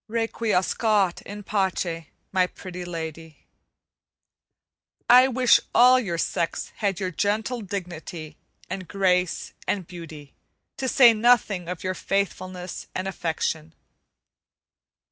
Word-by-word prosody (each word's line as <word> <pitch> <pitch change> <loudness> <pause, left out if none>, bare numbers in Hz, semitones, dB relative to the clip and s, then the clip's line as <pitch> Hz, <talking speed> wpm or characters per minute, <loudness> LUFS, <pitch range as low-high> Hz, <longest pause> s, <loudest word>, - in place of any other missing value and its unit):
Requiescat 215 -3 +1
in 205 +1 -7
pace, 185 -5 -1 0.3
my 185 -1 +3
Pretty 180 -1 -8
Lady. 160 -2 -7 1.6
I 250 +1 +8
wish 255 -1 +4 0.2
all 250 +1 +7
your 185 -9 -3
sex 165 0 -2
had 200 -3 -1
your 185 -2 -2
gentle 215 +6 -1
dignity, 175 -5 -6 0.3
and 185 -2 -6
grace, 180 -3 0
and 195 -3 -1
beauty, 160 -5 -10 0.4
to 265 - -2
say 245 -2 +7
nothing 215 -6 +2
of 180 -2 -5
your 185 0 -1
faithfulness 185 -1 -3
and 185 +1 -2
affection. 160 -3 -3
185 Hz, 105 wpm, -25 LUFS, 170-215 Hz, 1.6 s, I